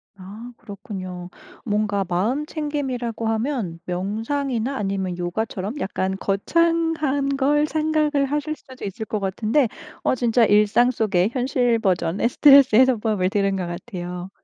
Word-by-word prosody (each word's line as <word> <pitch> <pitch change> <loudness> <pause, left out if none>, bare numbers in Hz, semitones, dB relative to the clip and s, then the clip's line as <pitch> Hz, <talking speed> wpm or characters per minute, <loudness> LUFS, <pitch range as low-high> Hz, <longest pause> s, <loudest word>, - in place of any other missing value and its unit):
아 205 +6 -10
그렇군요. 190 -5 -8 0.4
뭔가 205 -2 0
마음 225 +12 0
챙김이라고 265 -8 -3
하면 225 - -2
명상이나 225 +8 -2
아니면 195 -5 -2
요가처럼 200 +6 -3
약간 190 -2 -2
거창한 310 +4 +1
걸 295 +2 +2
생각을 305 -2 +1
하실 295 +2 -2
수도 260 -4 -14
있을 210 +3 -5
것 215 - -3
같은데 215 +7 +1 0.4
어 - - +2
진짜 240 -1 +2
일상 210 +4 +4
속의 205 -5 +1
현실 250 -2 +1
버전의 190 +1 0
스트레스 275 -3 +6
해소법을 220 -6 +3
들은 195 0 0
것 185 -2 -3
같아요. 180 -1 -6
225 Hz, 300 characters per minute, -22 LUFS, 195-275 Hz, 0.4 s, 스트레스